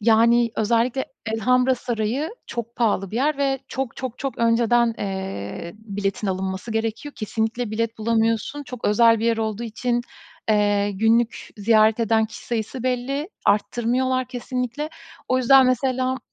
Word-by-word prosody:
yani, 230 +2 +4
özellikle 235 +4 +1 0.3
Elhamra 250 +3 +3
Sarayı 240 +5 -2 0.2
çok 235 0 -6
pahalı 205 -5 +1
bir 220 - -4
yer 290 +3 +1
ve 275 -1 +1
çok 265 -3 -4
çok 255 -2 -5
çok 275 -1 -4
önceden, 230 0 +3
eee, 190 - -5
biletin 205 -1 -3
alınması 190 +3 -3
gerekiyor. 225 +6 -3
Kesinlikle 225 +1 -2
bilet 225 +1 -2
bulamıyorsun. 225 +5 0
Çok 250 -3 -9
özel 230 +2 +5
bir 225 - -2
yer 230 -1 +2
olduğu 220 0 -2
için, 240 +2 -1 0.5
eee, 205 -1 +2
günlük 225 +3 +1
ziyaret 215 +1 +4
eden 220 0 +2
kişi 220 - -11
sayısı 235 +1 -3
belli. 260 +5 -1 0.2
Arttırmıyorlar, 245 +5 +1
kesinlikle. 250 +4 -3 0.4
O 255 - +3
yüzden, 260 +1 +6
mesela, 255 +1 +1
230 Hz, 140 wpm, -23 LUFS, 220-255 Hz, 0.5 s, yüzden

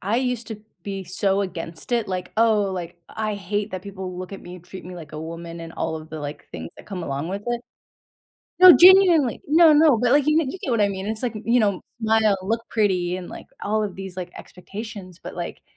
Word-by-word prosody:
I 205 +5 0
used 250 -2 -1
to 220 -2 -7 0.2
be 195 0 -5
so 195 +2 0
against 170 +1 -6
it, 230 -3 +1
like, 185 -1 -4
"Oh" 220 -2 +4
like, 175 -2 -6
"...I 215 -1 -3
hate 205 +1 -3
that 185 -1 -5
people 190 -2 -7
look 185 +1 -7
at 195 - -7
me, 180 +1 -10
treat 180 +2 -11
me 180 +1 -8
like 165 -3 -10
a 155 - -6
woman" 165 +1 -7
and 165 0 -8
all 160 - -3
of 155 0 -10
the, 160 - -7
like, 145 +1 -7
things 80 0 -7
that - - -14
come 190 -4 -5
along 140 +1 -3
with 200 +2 -4
it. 240 0 -1 1.0
No, 365 0 +11
genuinely. 355 - +6
No 320 +2 +6
no, 300 -3 +6
but, 245 +1 +2
like, 290 0 +4
you 305 0 +3
you 320 +4 -4
get 275 - -4
what 230 -2 +1
I 205 - +4
mean, 190 0 -5
it's 220 +2 -3
like, 245 -3 -2
y 215 - -7
you 240 +2 +3
know, 200 -4 +1 0.2
smile, 220 -2 +3
look 225 +4 -1
pretty, 185 -5 +1
and, 180 - -8
like, - - -10 0.2
all 215 +1 0
of 200 -3 -5
these, 190 -1 -8
like, 180 -1 -6
expectations. 195 -1 -9
But - - -8
like, - - -6
200 Hz, 235 wpm, -23 LUFS, 180-230 Hz, 1.0 s, No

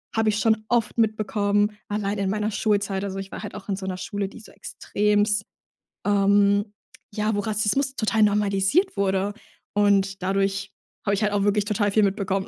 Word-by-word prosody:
habe 225 -1 +2
ich 210 0 0
schon 220 -2 +2
oft 235 -2 +1
mitbekommen, 210 -1 +1
allein 205 0 -2
in 195 -1 -1
meiner 210 +1 -1
Schulzeit. 200 -2 0
Also, 195 -1 -4
ich 195 0 -7
war - - -7
halt - - -7
auch 210 0 -10
in 195 - +1
so 190 0 -7
'ner 185 -1 -3
Schule, 200 +1 -3
die 195 - -12
so 215 - -15
extremst 205 +1 0 0.6
ähm, 200 0 +3 0.4
ja, 215 +1 0
wo - - 0
Rassismus 220 +6 0
total 220 -1 +1
normalisiert 205 - +2
wurde. 195 0 0 0.4
Und 200 -2 +2
dadurch 195 +1 -1 0.3
hab 200 - +1
ich 205 +2 0
halt 210 - +1
auch 200 -1 +1
wirklich 205 0 +2
total 205 0 +1
viel 215 +1 +3
mitbekommen. 195 -1 0
205 Hz, 185 wpm, -24 LUFS, 195-215 Hz, 0.6 s, ähm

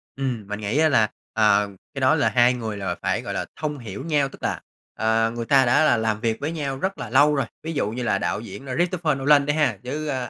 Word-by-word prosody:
Ừm. 125 -6 -3
Mình 105 +1 -5
nghĩ 105 +6 -2
á 160 0 +4
là, 110 -7 +3 0.2
ờ, 105 -2 +3 0.2
cái 135 - -5
đó 130 +4 +4
là 145 - +2
hai 120 0 +4
người 110 -4 -4
là 95 -2 -3
phải, - - 0
gọi - - -5
là, - - -2
thông 150 -2 -3
hiểu 115 +1 -7
nhau. 145 -4 +1
Tức - - -15
là, - - -2 0.3
ờ, 115 0 +1
người 120 -1 -3
ta 135 +1 +4
đã 125 +5 +4
là 120 - +4
làm 110 -1 -1
việc 115 -2 -1
với 145 +3 -3
nhau 140 -5 -3
rất 190 +4 -2
là 125 -5 -6
lâu 145 +4 +4
rồi. 140 -3 0 0.2
Ví 165 +1 -4
dụ 140 -9 -1
như 125 +2 -4
là 100 - +1
đạo 85 0 -2
diễn 135 +4 -9
Christopher 175 -4 0
Nolan 140 +1 +4
đi 145 - +1
ha, 150 -2 +1
với, 150 +5 -4
ơ, 130 -4 -3
130 Hz, 260 wpm, -23 LUFS, 110-145 Hz, 0.3 s, á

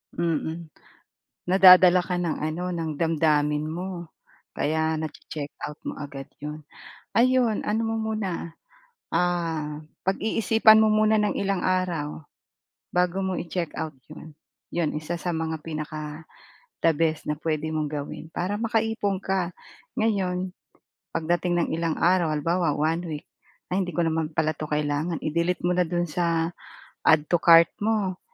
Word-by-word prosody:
Mm. 165 -1 -2 0.8
Nadadala 185 -1 +8
ka 180 +1 -3
ng 170 -3 -1
ano, 160 +4 -2
ng 165 -2 -2
damdamin 150 -2 +2
mo. 175 +1 -5 0.4
Kaya 160 +2 0
nache-check-out 150 -1 -6
mo - - -4
agad 140 -2 -7
'yon. 150 +1 -6 0.5
Ayon 245 -2 +3
ano 215 +2 0
mo 225 - -1
muna, 210 -7 -3 0.6
ah, 165 -4 0 0.3
pag-iisipan 220 +2 +4
mo 220 - +4
muna 215 0 +4
ng 210 - +1
ilang 195 -2 0
araw 170 -5 -1 0.7
bago 180 +1 +2
mo 190 - -1
i-check-out 170 -3 -4 0.2
'yon. 155 +1 -10 0.5
'Yon 170 -3 +1
isa 155 +3 -3
sa 180 - -2
mga 160 -1 -2
pinaka 155 0 -6 0.6
the 165 - +5
best 160 0 0
na 150 - 0
puwede 155 0 -2
mong 155 -2 -1
gawin, 145 0 -5
para 195 +4 -2
maka-ipon 225 -3 0
ka. 185 -2 -1 0.5
Ngayon 190 -4 0 0.7
pagdating 175 +2 0
ng - - -6
ilang 165 -1 -1
araw 175 -2 +3
halimbawa 165 +1 +1
1 160 +3 +1
week, 150 -2 -6 0.5
ay 195 - +2
hindi 180 - -5
ko 175 -1 0
naman 160 -1 -1
pala 155 0 +1
'to 155 - -5
kailangan, 150 +2 -1
i-delete 170 +3 -1
mo 180 - +2
na 180 - +3
do'n 175 +1 -1
sa 165 0 0 0.5
add 155 -2 +4
to 175 - +4
cart 165 -1 +7
mo. 205 -4 0
170 Hz, 140 wpm, -25 LUFS, 155-185 Hz, 0.8 s, Nadadala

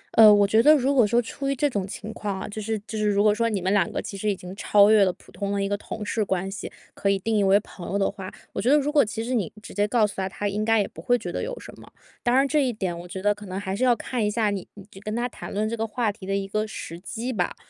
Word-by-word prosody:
呃， 220 -2 +9
我 205 -1 +6
觉 220 +3 +4
得 305 +4 +7
如 275 0 +2
果 245 -6 +5
说 235 +3 +3
出 275 +4 -3
于 275 - 0
这 290 +3 +2
种 200 -7 -2
情 215 +2 -7
况 200 -2 -4
啊， - - -5
就 215 +1 -6
是 220 +1 -2
就 220 -2 -5
是 210 - +1
如 205 0 +2
果 210 -1 +5
说 230 +1 +1
你 205 -3 -1
们 190 +3 0
2 195 -4 +2
个 - - -3
其 - - -6
实 210 +2 -1
已 200 - +1
经 180 +1 -9
超 205 0 +5
越 215 -2 +6
了 185 - +3
普 - - -20
通 200 -1 -4
的 200 0 0
一 195 - 0
个 205 - 0
同 210 +1 -6
事 215 0 0
关 190 -1 -1
系， 200 - -6 0.2
可 200 - -1
以 195 - +3
定 220 +3 -1
义 205 - +3
为 195 +1 +5
朋 180 -4 -10
友 200 - 0
的 195 - +1
话， 190 0 -8 0.2
我 - - -2
觉 245 - +1
得 295 - +6
如 295 0 0
果 295 -2 +5
其 225 +1 -4
实 250 +2 -3
你 200 -10 0
直 - - -10
接 205 +1 +1
告 225 -1 +3
诉 205 - -4
他， 190 0 -1
他 205 +2 -3
应 205 +2 -1
该 225 0 +3
也 200 - +1
不 - - -12
会 245 -1 +2
觉 - - -6
得 - - -3
有 - - -5
什 - - -11
么。 - - -15 0.3
当 240 +1 +2
然 275 +1 +4
这 295 0 +2
一 255 - +1
点， 185 -6 -3
我 175 - -9
觉 190 +2 -7
得 205 0 +4
可 210 -1 -12
能 185 +1 -4
还 190 -1 -3
是 245 - -2
要 245 -2 +5
看 235 +1 -3
一 210 - +2
下 215 -1 +1
你 195 -3 -4
你 200 -1 -12 0.2
跟 215 +1 -4
他 240 +1 0
谈 250 - -9
论 215 +2 -1
这 230 - -2
个 225 0 -2
话 220 -1 0
题 200 -2 -11
的 195 - 0
一 195 0 -2
个 215 +2 -1
时 170 -4 -7
机 235 +6 -4
吧。 180 -4 -1
210 Hz, 355 characters per minute, -25 LUFS, 195-230 Hz, 0.3 s, 呃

